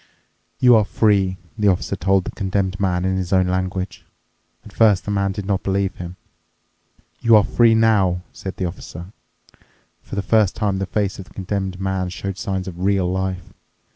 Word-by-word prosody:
"You 125 -1 +6
are 110 - +4
free," 100 -3 +2 0.2
the 105 - +3
Officer 95 -3 +1
told 95 +2 +2
the - - -4
Condemned 95 -1 -2
Man 90 -2 0
in 95 0 0
his 90 -2 -3
own 95 -1 +4
language. 95 +1 -3 0.6
At - - -13
first 105 -5 +3
the 105 - -2
man 100 -1 0
did 95 0 -5
not 100 -1 0
believe 95 -1 -1
him. 90 0 -7 1.0
"You 115 -2 +5
are 105 - +6
free 115 +1 +4
now," 100 -6 +3
said 95 - -7
the 95 - -1
Officer. 90 +1 -8 0.9
For - - -8
the 100 - -1
first 105 -1 +3
time 100 -3 -1
the 95 - -2
face 100 -1 -1
of 95 - -7
the - - -20
Condemned 95 -1 -3
Man 95 -1 -1
showed 95 +2 -5
signs 95 0 -3
of 90 -2 -7
real 95 0 +1
life. 95 -1 -3
95 Hz, 185 wpm, -21 LUFS, 95-100 Hz, 1.0 s, You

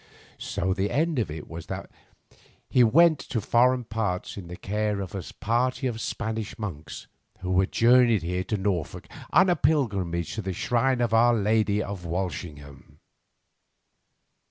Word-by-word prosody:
So 95 +2 -1
the 100 +1 -1
end 155 +2 0
of 110 - -1
it 75 0 -7
was 80 -1 -8
that - - -6 0.8
he 125 - +4
went 155 +7 +5
to 115 - -3
foreign 125 +4 +3
parts 110 -5 -3
in 95 -4 -8
the 90 - -7
care 105 +2 -2
of 95 -2 -6
a 100 - -3 0.2
party 125 +4 0
of 115 -3 -2
Spanish 110 -2 -4
monks, 80 -8 -7 0.4
who 90 0 +1
had 95 - +1
journeyed 120 -4 +4
here 90 +2 -2
to 105 - -1
Norfolk 95 -5 -3 0.2
on 185 +5 +5
a 180 - +3
pilgrimage 95 - 0
to 110 - -3
the 95 -1 -4
shrine 125 +6 +1
of 115 -2 0
our 120 +1 +5
Lady 105 -1 +1
of 100 -3 -6
Walsingham. 80 -5 -6
105 Hz, 155 wpm, -26 LUFS, 90-120 Hz, 0.8 s, went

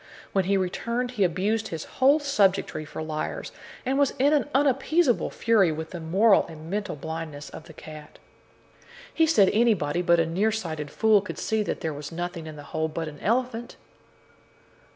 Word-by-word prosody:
When 195 -2 +2
he 195 +1 +2
returned, 235 +7 -2
he 215 -6 0
abused 205 +5 0
his 165 -2 -5
whole 275 +4 +3
subjectry 200 - +1
for 155 - -6
liars, 155 -1 -4 0.3
and 265 +2 +1
was 285 - +2
in 280 +3 +3
an 295 -1 +1
unappeasable 275 +1 +2
fury 210 -7 +3
with 160 +1 -5
the 175 - -6
moral 195 +6 +3
and 160 +1 -10
mental 205 -3 -2
blindness 155 -1 -6
of 155 - -10
the 160 - -13
cat. 155 -1 -11 1.0
He 325 - +3
said 205 -11 +5
that - - -3
anybody 205 -9 +2
but 170 -1 +3
a 165 - +3
near 190 +7 +1
sighted 160 -9 -4
fool 215 +5 +3
could 205 - -7
see 220 0 0
that 210 - -3
there 160 -3 -2
was 145 0 -7
nothing 175 -1 -5
in 155 - -8
the 145 - -10
hole 160 0 0
but 160 +1 -4
an 150 -1 -9
elephant. 240 +1 -1
190 Hz, 185 wpm, -26 LUFS, 160-230 Hz, 1.0 s, said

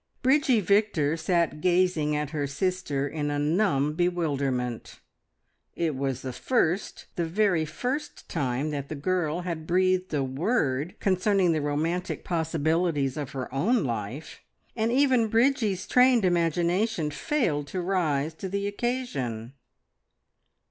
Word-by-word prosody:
Bridgie 265 -3 +4
Victor 195 -7 +2
sat 165 -2 0
gazing 175 -4 +2
at 150 -1 -2
her 145 -3 -2
sister 145 -3 -1
in 145 0 -3
a 145 - -1
numb 150 -1 +1
bewilderment. 140 -8 -1 0.8
It 165 -4 -1
was 135 -1 -2
the 130 -1 -4
first, 195 - 0
the 170 - 0
very 180 -2 +2
first 250 - -4
time 140 -1 -1
that 140 -2 -4
the 155 - -4
girl 170 +2 -1
had 165 -3 -5
breathed 185 +1 +2
a 145 -3 0
word 145 - -1
concerning 190 -1 +2
the 155 -2 0
romantic 160 +5 -2
possibilities 160 -3 0
of 145 -3 -5
her 130 -2 -5
own 215 - +2
life, 120 +4 -5 0.4
and 225 0 0
even 255 -3 +3
Bridgie's 225 -4 +1
trained 250 -4 +4
imagination 175 +1 +1
failed 150 - -1
to 185 - -4
rise 165 -5 0
to 190 +4 -6
the 200 +1 -2
occasion. 200 - -3
170 Hz, 130 wpm, -27 LUFS, 145-195 Hz, 0.8 s, Bridgie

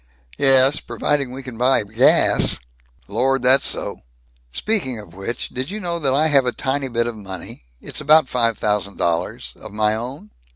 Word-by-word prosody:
"Ye 140 - 0
es, 135 +2 +5
providing 140 -4 -2
we 135 +1 -8
can 125 -3 -9
still - - -13
buy 130 -1 +3
gas." 110 +5 +3 0.5
"Lord, 130 +5 0
that's 130 +2 +5
so." - - -1 0.5
"Speaking 175 - -1
of 100 -6 -12
which, 95 +6 -5
did 130 +3 -4
you 210 +3 -5
know 170 -4 -3
that 135 -4 0
I 150 +3 +3
have 140 -4 +3
a - - +2
tiny 135 +2 -2
bit 115 -2 0
of 120 -1 -4
money 95 - -9
it's - - -5
about 155 -1 +5
five 115 -4 0
thousand 105 -2 -1
dollars 80 -7 -2
of - - -11
my 105 0 +1
own?" 115 0 -7
125 Hz, 190 wpm, -20 LUFS, 105-135 Hz, 0.5 s, es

